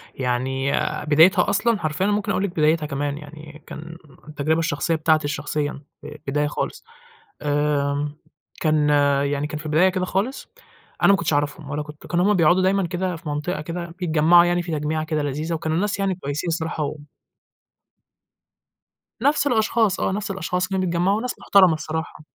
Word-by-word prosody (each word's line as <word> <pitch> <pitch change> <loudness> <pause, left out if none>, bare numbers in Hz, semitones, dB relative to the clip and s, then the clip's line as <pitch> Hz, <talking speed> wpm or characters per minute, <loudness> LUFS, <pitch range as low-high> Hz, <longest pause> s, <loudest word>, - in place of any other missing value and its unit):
يعني 130 +2 -1
آآ - - -2
بدايتها 160 +7 +5
أصلًا 215 +2 +1
حرفيًا 155 +4 -1
ممكن 205 0 0
أقول 190 - 0
لِك 200 - 0
بدايتها 155 -1 +1
كمان، 145 0 -3
يعني 150 0 -12
كان 165 +2 -9 0.3
التجربة 155 +1 0
الشخصية 165 0 0
بتاعتي 155 -1 +2
شخصيًا، 145 0 -3 0.2
في - - -9 0.2
البداية 145 +2 +1
خالص. - - -4 0.6
آمم، 145 0 0 0.4
كان 155 -2 +2 0.4
يعني 145 +1 -1
كان 150 0 -5
في 155 - -10
البداية 155 +5 +4
كده 185 -1 -1
خالص، 200 +9 -2 0.6
أنا - - +6
ما - - +6
كنتش 160 -2 -1
أعرَفهم 145 +1 -1
ولا 150 +1 -2
كنت 150 0 -12
كانوا 175 +2 +1
هُم 210 - +4
بيقعدوا 175 0 +4
دايمًا 190 0 +2
كده 180 +1 -2
في 160 -2 -8
منطقة 150 +2 -3
كده 170 +3 -5
بيتجمّعوا 170 0 +5
يعني 175 0 +1
في 175 -1 -6
تجميعة 155 +1 -1
كده 155 -2 -2
لذيذة، 150 +4 -3
وكانوا 160 0 -1
ناس 205 +2 -1
يعني 195 -1 0
كويسين 150 0 -4
الصراحة 160 -1 -2
و 145 - -3 2.3
نَفْس 285 +2 +2
الأشخاص 220 -3 +2
آه، - - 0
نَفْس 200 +1 -3
الأشخاص 180 -1 -2
كانوا 190 -1 -1
بيتجمّعوا، 175 +4 +1
وناس 245 +3 -3
محترمة 185 -5 +5
بصراحة. 155 0 -5
160 Hz, 170 wpm, -22 LUFS, 150-185 Hz, 2.3 s, أنا